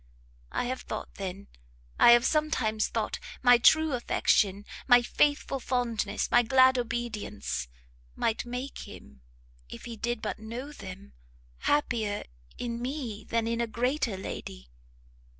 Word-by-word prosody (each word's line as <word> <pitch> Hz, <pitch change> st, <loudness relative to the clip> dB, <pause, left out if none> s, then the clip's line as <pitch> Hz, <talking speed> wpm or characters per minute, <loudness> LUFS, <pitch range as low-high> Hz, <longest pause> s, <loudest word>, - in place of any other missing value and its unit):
I -, -, -1 dB
have 255 Hz, +1 st, -3 dB
thought, -, -, -6 dB
then, 195 Hz, +1 st, -6 dB, 0.5 s
I 235 Hz, -, +9 dB
have 240 Hz, +1 st, +5 dB
sometimes 255 Hz, -9 st, +1 dB
thought, -, -, -2 dB, 0.2 s
my 245 Hz, -1 st, +7 dB
true 315 Hz, +4 st, +5 dB
affection, 205 Hz, -4 st, +1 dB, 0.2 s
my 245 Hz, -2 st, +7 dB
faithful 290 Hz, +1 st, +1 dB
fondness, 235 Hz, -5 st, -1 dB
my 240 Hz, -, +6 dB
glad 260 Hz, +1 st, +5 dB
obedience, 210 Hz, -, -3 dB, 0.5 s
might 225 Hz, -, 0 dB
make 250 Hz, +3 st, -6 dB
him, 70 Hz, -1 st, -13 dB, 0.5 s
if -, -, -9 dB
he 235 Hz, -, -6 dB
did 240 Hz, +2 st, -2 dB
but -, -, -4 dB
know 235 Hz, +6 st, -6 dB
them, 185 Hz, -, -10 dB, 0.5 s
happier 225 Hz, -8 st, 0 dB, 0.3 s
in 235 Hz, -1 st, -4 dB
me 250 Hz, -5 st, -4 dB
than 230 Hz, -1 st, 0 dB
in 230 Hz, +1 st, -1 dB
a 235 Hz, -, 0 dB
greater 245 Hz, -1 st, -1 dB
lady!" 60 Hz, -, -7 dB
235 Hz, 135 wpm, -28 LUFS, 210-255 Hz, 0.5 s, I